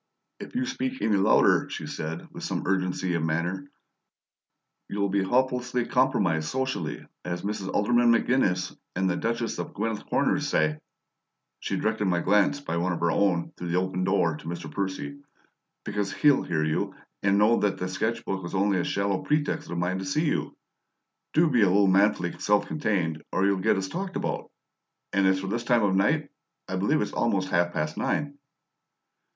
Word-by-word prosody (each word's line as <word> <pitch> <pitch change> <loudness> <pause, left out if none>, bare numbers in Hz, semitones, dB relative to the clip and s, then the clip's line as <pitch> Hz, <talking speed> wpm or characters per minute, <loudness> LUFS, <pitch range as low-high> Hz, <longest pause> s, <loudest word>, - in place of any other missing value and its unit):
"If - - -9
you 255 +1 +1
speak 260 0 -3
any 110 - +3
louder," 95 0 +4
she - - -5
said, 80 +1 -5
with - - -9
some - - -2
urgency 90 -1 0
of 85 - 0
manner, 85 +4 -2 1.2
"you'll 100 0 -1
be 100 +1 +1
'hopelessly 125 +3 +1
compromised 100 -12 +1
socially,' 130 - -3 0.2
as 90 -1 -4
Mrs. 100 -2 -3
Alderman 120 +3 +3
McGinnis 100 -7 +1 0.2
and 95 +1 +1
the 90 - +1
Duchess 115 +2 -2
of - - -5
Gwythyl 110 +1 -3
Corners - - +1
say" 75 -1 +1 0.8
she - - -2
directed 105 - 0
my 90 -2 +2
glance, 105 +9 +3
by 85 -12 -3
one 90 +2 0
of - - -4
her 85 - +2
own, 90 -4 +1
through 90 - -6
the 85 +1 0
open 90 0 -1
door 90 -4 +2
to 80 - -12
Mr. 85 -2 -5
Percy 100 - -4 0.7
"because 100 -1 -2
HE'LL 145 -2 +4
hear 80 -3 -1
you 80 0 -1 0.3
and 100 0 +3
know 110 +3 +4
that 105 -1 +1
the 90 - -3
sketch 110 +5 -2
book 95 -1 -2
was 85 +2 -6
only 100 0 +2
a - - 0
shallow 100 -1 0
pretext 150 0 -1
of 85 - -4
mine 90 +2 -1
to 95 - -5
see 150 - 0
you. 150 - -1 0.8
Do 165 +2 +5
be 125 -7 +3
a 100 - +6
little 100 +2 +4
manfully 95 -2 +3
self 105 0 +2
contained, 90 - -1
or 95 - +1
you'll 100 -1 +2
get 95 - +2
us 95 0 -2
talked 185 - -5
about! - - -3 0.6
And 100 -1 +3
as 95 0 +3
for - - -5
'this 115 +4 -2
time 120 -2 +3
of 100 -2 +2
night,' 95 +2 +1 0.4
I 95 - -3
believe 145 +11 +2
it's - - -6
almost 100 -5 0
half 85 -1 +2
past 75 -1 -2
nine." 145 -1 -2
95 Hz, 185 wpm, -27 LUFS, 90-115 Hz, 1.2 s, a